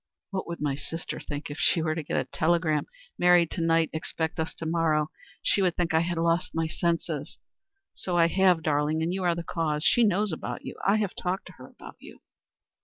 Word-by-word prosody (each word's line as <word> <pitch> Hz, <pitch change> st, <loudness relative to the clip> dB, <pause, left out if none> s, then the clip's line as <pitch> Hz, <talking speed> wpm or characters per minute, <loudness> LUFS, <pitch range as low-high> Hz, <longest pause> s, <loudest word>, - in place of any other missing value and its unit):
"What 190 Hz, -1 st, -3 dB
would 170 Hz, 0 st, -5 dB
my 145 Hz, -2 st, 0 dB
sister 165 Hz, +4 st, -6 dB
think 145 Hz, 0 st, -6 dB
if 145 Hz, -, -7 dB
she 170 Hz, -, +3 dB
were 160 Hz, -1 st, 0 dB
to 160 Hz, -, -3 dB
get 150 Hz, -, -3 dB
a -, -, +2 dB
telegram 160 Hz, -2 st, +1 dB, 0.3 s
'Married 175 Hz, -2 st, +5 dB
to 170 Hz, -, -3 dB
night. 165 Hz, 0 st, +2 dB
Expect 160 Hz, 0 st, -3 dB
us 160 Hz, -, -1 dB
to 165 Hz, -, -6 dB
morrow?' 160 Hz, -2 st, +1 dB, 0.3 s
She 200 Hz, -, +2 dB
would 180 Hz, -3 st, +2 dB
think 175 Hz, -2 st, 0 dB
I 160 Hz, -, +5 dB
had 170 Hz, +1 st, -1 dB
lost 170 Hz, +2 st, +1 dB
my 165 Hz, 0 st, +1 dB
senses. 170 Hz, +1 st, -2 dB, 0.6 s
So 180 Hz, -2 st, -2 dB
I 170 Hz, -, +6 dB
have, 180 Hz, -1 st, +3 dB
darling; 150 Hz, +1 st, +1 dB
and 170 Hz, +2 st, 0 dB
you 190 Hz, 0 st, -2 dB
are 175 Hz, -1 st, +2 dB
the 170 Hz, -, -4 dB
cause. 155 Hz, -3 st, -1 dB
She 235 Hz, +7 st, +4 dB
knows 205 Hz, -1 st, +2 dB
about 160 Hz, -, -5 dB
you. -, -, -6 dB
I 200 Hz, -, +4 dB
have 205 Hz, -4 st, -1 dB
talked 185 Hz, +2 st, -3 dB
to -, -, -11 dB
her -, -, -10 dB
about -, -, -13 dB
you." -, -, -13 dB
165 Hz, 220 wpm, -27 LUFS, 160-180 Hz, 0.6 s, I